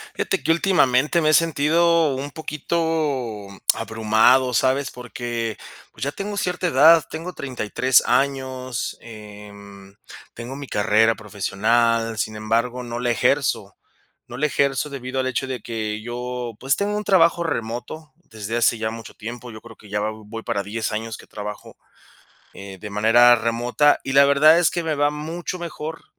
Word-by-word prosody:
Fíjate -, -, -1 dB
que -, -, -1 dB
últimamente 165 Hz, -4 st, +2 dB
me 155 Hz, -, +2 dB
he -, -, +4 dB
sentido 165 Hz, 0 st, +3 dB
un 140 Hz, +2 st, -5 dB
poquito 150 Hz, -8 st, -2 dB, 0.3 s
abrumado, 115 Hz, +3 st, +2 dB
¿sabes? 130 Hz, +3 st, +1 dB
Porque, 120 Hz, -2 st, -5 dB, 0.4 s
pues, 110 Hz, -, -15 dB
ya 140 Hz, -, -1 dB
tengo 205 Hz, +4 st, -5 dB
cierta 180 Hz, -1 st, -1 dB
edad, 160 Hz, +1 st, +6 dB
tengo 165 Hz, +3 st, -6 dB
33 130 Hz, -2 st, +1 dB
años, 130 Hz, -1 st, -1 dB
em, 100 Hz, -3 st, -12 dB, 0.4 s
tengo 120 Hz, +3 st, -7 dB
mi 140 Hz, 0 st, -7 dB
carrera 110 Hz, +1 st, +2 dB
profesional, 110 Hz, +2 st, 0 dB
sin 110 Hz, +1 st, -2 dB
embargo, 115 Hz, +3 st, -1 dB
no 120 Hz, -1 st, -5 dB
la 120 Hz, 0 st, -1 dB
ejerzo, 120 Hz, -5 st, 0 dB, 0.5 s
no 120 Hz, -, -9 dB
la 150 Hz, +4 st, +1 dB
ejerzo 140 Hz, 0 st, 0 dB
debido 130 Hz, -1 st, -4 dB
al 130 Hz, -, -2 dB
hecho 130 Hz, +1 st, -2 dB
de 130 Hz, -1 st, -5 dB
que 110 Hz, -2 st, -4 dB
yo, 120 Hz, 0 st, -5 dB
pues, 135 Hz, +2 st, +1 dB
tengo 205 Hz, +1 st, -1 dB
un 210 Hz, -, -3 dB
trabajo 170 Hz, -4 st, +3 dB
remoto 130 Hz, +3 st, -5 dB
desde 110 Hz, -, -7 dB
hace 120 Hz, 0 st, +2 dB
ya 110 Hz, 0 st, -2 dB
mucho 115 Hz, -2 st, -9 dB
tiempo, 120 Hz, +2 st, -8 dB
yo 110 Hz, -, -10 dB
creo 115 Hz, 0 st, -14 dB
que 105 Hz, -, -17 dB
ya 105 Hz, +1 st, -2 dB
va 105 Hz, +1 st, -1 dB
voy 110 Hz, +1 st, -9 dB
para 100 Hz, -, -2 dB
10 110 Hz, +3 st, -3 dB
años 110 Hz, 0 st, -4 dB
que -, -, -15 dB
trabajo, 105 Hz, 0 st, -8 dB, 0.8 s
eh, 100 Hz, -1 st, -10 dB
de 105 Hz, +2 st, -8 dB
manera 115 Hz, +4 st, +5 dB
remota, 120 Hz, +5 st, +2 dB
y 135 Hz, -, -3 dB
la 140 Hz, +1 st, +7 dB
verdad 150 Hz, +4 st, +6 dB
es 175 Hz, -, +3 dB
que 175 Hz, -, -2 dB
me 160 Hz, -1 st, -1 dB
va 145 Hz, 0 st, +2 dB
mucho 165 Hz, +4 st, -5 dB
mejor 160 Hz, -2 st, -7 dB
125 Hz, 165 wpm, -22 LUFS, 110-150 Hz, 0.8 s, la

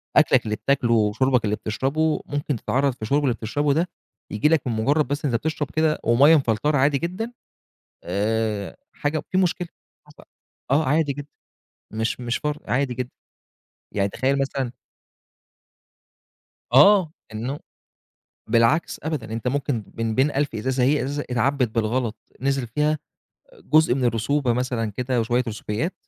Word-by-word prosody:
أكْلك -, -, +5 dB
اللي 105 Hz, -1 st, -1 dB
بتاكله 130 Hz, -1 st, +1 dB
وشُربك 115 Hz, +3 st, +2 dB
اللي 105 Hz, 0 st, +1 dB
بتشربه 140 Hz, +9 st, -1 dB
ممكن 145 Hz, 0 st, -2 dB
تتعرَّض 135 Hz, +4 st, 0 dB
في 120 Hz, -, -24 dB
الشُرب 140 Hz, +7 st, +1 dB
اللي 130 Hz, -4 st, +2 dB
بتشربه 145 Hz, +6 st, 0 dB
ده 170 Hz, +5 st, 0 dB, 0.4 s
ييجي 105 Hz, +8 st, +2 dB
لك 160 Hz, -5 st, +2 dB
من 120 Hz, -, 0 dB
مجرد 140 Hz, +7 st, +1 dB
بس 145 Hz, +1 st, -2 dB
أنت 130 Hz, -5 st, +1 dB
بتشرب 150 Hz, +2 st, -2 dB
كده 155 Hz, -1 st, +1 dB
ومَيّة 135 Hz, +8 st, +6 dB
مفلترة 140 Hz, +2 st, +1 dB
عادي 140 Hz, +1 st, +3 dB
جدًا 185 Hz, -, -4 dB, 0.7 s
آآ، 105 Hz, +2 st, -1 dB, 0.2 s
حاجة 150 Hz, +1 st, -2 dB
في 185 Hz, -, +1 dB
مشكلة 180 Hz, -1 st, 0 dB, 0.4 s
حصلت، 150 Hz, 0 st, -18 dB, 0.4 s
آه 145 Hz, +4 st, +3 dB
عادي 150 Hz, 0 st, +2 dB
جدًا 145 Hz, +1 st, -8 dB, 0.6 s
مش 110 Hz, +2 st, -2 dB
مش 120 Hz, -1 st, -1 dB
فر 150 Hz, 0 st, -3 dB
عادي 125 Hz, +3 st, 0 dB
جدًا. 125 Hz, 0 st, -4 dB, 0.9 s
يعني 100 Hz, -1 st, +1 dB
تخيل 135 Hz, +6 st, 0 dB
مثلًا 135 Hz, -2 st, -2 dB, 2.0 s
آه، 175 Hz, +4 st, +6 dB, 0.2 s
إنه 125 Hz, +7 st, -4 dB, 0.9 s
بالعكس، 115 Hz, +8 st, +2 dB
أبدًا، 145 Hz, -8 st, -3 dB
أنت 115 Hz, +2 st, -3 dB
ممكن 135 Hz, -3 st, -1 dB
من 115 Hz, -1 st, -1 dB
بين 135 Hz, +5 st, +3 dB
1000 140 Hz, -3 st, -1 dB
إزازة، 130 Hz, +4 st, 0 dB
هي 145 Hz, +4 st, +3 dB
إزازة 145 Hz, +2 st, -3 dB
اتعبِّت 125 Hz, +2 st, +1 dB
بالغلط، 115 Hz, 0 st, 0 dB, 0.3 s
نزِل 135 Hz, -2 st, 0 dB
فيها 150 Hz, +6 st, +1 dB, 0.7 s
جزء 155 Hz, -5 st, +4 dB
من 130 Hz, -1 st, -1 dB
الرسوبة 120 Hz, +3 st, +1 dB
مثلًا 120 Hz, -2 st, -1 dB
كده 125 Hz, +3 st, -1 dB
وشوية 120 Hz, +2 st, +1 dB
رسوبيات، 110 Hz, -, -3 dB
130 Hz, 145 wpm, -23 LUFS, 115-150 Hz, 2.0 s, ومَيّة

